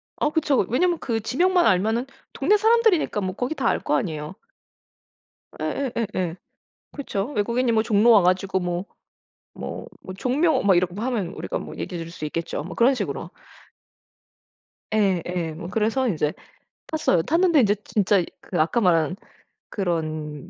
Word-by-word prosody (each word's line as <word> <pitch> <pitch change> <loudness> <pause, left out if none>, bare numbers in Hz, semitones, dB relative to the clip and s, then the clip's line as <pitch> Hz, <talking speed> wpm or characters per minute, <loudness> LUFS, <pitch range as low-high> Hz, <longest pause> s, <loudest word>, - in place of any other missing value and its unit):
어 300 - 0
그쵸. 295 - +2
왜냐하면 345 +9 +2
그 230 -2 -1
지명만 350 - +2
알면은 220 +6 +2 0.3
동네 420 - +3
사람들이니까 445 - +3
뭐 185 -1 -3
거기 250 +7 -2
다 - - -1
알 - - +2
거 - - +1
아니에요. 160 - -3 1.3
예예예예. 225 -10 -2 0.6
그렇죠. 205 -9 -3
외국인이 235 +3 +1
뭐 220 -1 +2
종로 225 +1 +4
와 210 - +7
가지고 185 +1 +1
뭐 175 +1 -3 0.7
뭐 - - -6 0.2
뭐 185 - -9
종묘 280 - +1
막 200 -2 +4
이렇게 180 0 -1
하면 230 -5 -1
우리가 185 - -4
뭐 - - -8
얘기해 175 -2 -5
줄 165 - -8
수 160 -2 -7
있겠죠 155 -1 -3
뭐 180 - -7
그런 250 +4 +4
식으로. - - -4 1.7
예예. 180 -5 0
뭐 170 0 -7
그래서 225 +6 +1
인제 155 -7 0 0.5
탔어요. 185 - +1
탔는데 335 -2 +3
이제 205 -2 +3
진짜 200 -2 +2 0.2
그 175 - -4
아까 210 +9 +1
말한 175 -2 +2 0.5
그런 155 -6 -3
205 Hz, 305 characters per minute, -24 LUFS, 180-255 Hz, 1.7 s, 와